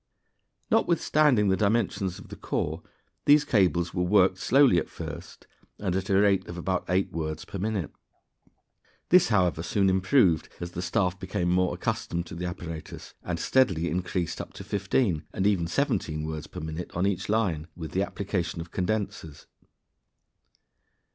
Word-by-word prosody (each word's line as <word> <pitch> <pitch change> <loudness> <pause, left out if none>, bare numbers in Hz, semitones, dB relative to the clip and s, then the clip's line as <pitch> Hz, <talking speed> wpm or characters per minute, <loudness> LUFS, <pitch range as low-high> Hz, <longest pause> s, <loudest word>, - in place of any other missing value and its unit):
Notwithstanding 150 - +3
the 95 - +3
dimensions 100 -2 0
of - - -13
the - - -8
core, - - -3 0.4
these 145 +1 +6
cables 90 - +2
were 90 - -1
worked 95 0 +3
slowly 130 -7 +5
at - - -5
first, - - -8 0.3
and 95 -3 -2
at 95 +1 -2
a 95 0 +4
rate 100 -2 +3
of 85 - -7
about 90 +1 -1
eight 95 +1 +1
words 80 -1 -4
per 100 - -6
minute. 100 -5 -2 1.2
This, 180 0 +6
however, 90 -7 +2
soon 95 +3 +2
improved 95 - +3
as 85 0 -5
the 90 - -5
staff 90 0 0
became 90 -2 -2
more 90 0 +2
accustomed 85 +1 -2
to - - -10
the 90 +1 -4
apparatus, 85 -3 -7
and - - -3
steadily 90 -11 +2
increased 90 -1 -2
up - - -10
to - - -9
fifteen 100 -3 0
and 95 - -1
even 95 -5 +2
seventeen 85 - -1
words 80 -1 -5
per - - -8
minute 80 +2 -5
on 90 +3 +1
each 100 -1 -1
line, 95 -8 0
with 80 -2 -7
the 95 - 0
application 95 -3 -3
of 85 +1 -7
condensers. 95 -6 -3
95 Hz, 160 wpm, -27 LUFS, 85-100 Hz, 1.2 s, these